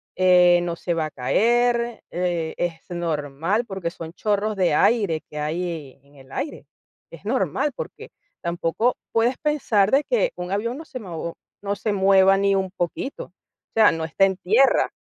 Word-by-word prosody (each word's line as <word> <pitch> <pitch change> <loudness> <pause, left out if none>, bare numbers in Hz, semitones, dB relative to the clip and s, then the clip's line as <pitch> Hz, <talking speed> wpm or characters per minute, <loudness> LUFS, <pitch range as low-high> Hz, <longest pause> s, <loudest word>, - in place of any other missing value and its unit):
eh, 180 -1 +5
no 175 -1 -2
se 170 +1 -2
va 160 -2 -1
a 155 - -6
caer, 235 - +1
eh, 175 -2 -1
es 170 -2 -3
normal", 165 - -1
porque 190 -6 -4
son 165 0 -9
chorros 210 +1 -1
de 180 -5 +2
aire 195 -6 +2
que 150 - -6
hay 155 -3 -4
en 140 +1 -24
el 135 0 -17
aire, 300 - -5 0.4
es - - -13
normal, 295 - 0
porque - - -8 0.3
tampoco 170 +7 0 0.2
puedes 235 +3 +2
pensar 240 -10 +2
de 280 +2 +4
que - - +1
un 180 +1 -6
avión 230 +6 -1
no 320 - -9
se 255 - -7
mo 170 -4 -6 0.3
no 200 0 -1
se 210 +1 -2
mueva 195 0 +5
ni 200 0 +2
un 190 -1 0
poquito, 180 +9 -4
o - - -24 0.4
sea, 220 -2 +6
no 165 0 -3
está 180 +4 +3
en 190 -1 -1
tierra. 230 +10 +3
190 Hz, 175 wpm, -23 LUFS, 170-225 Hz, 0.4 s, sea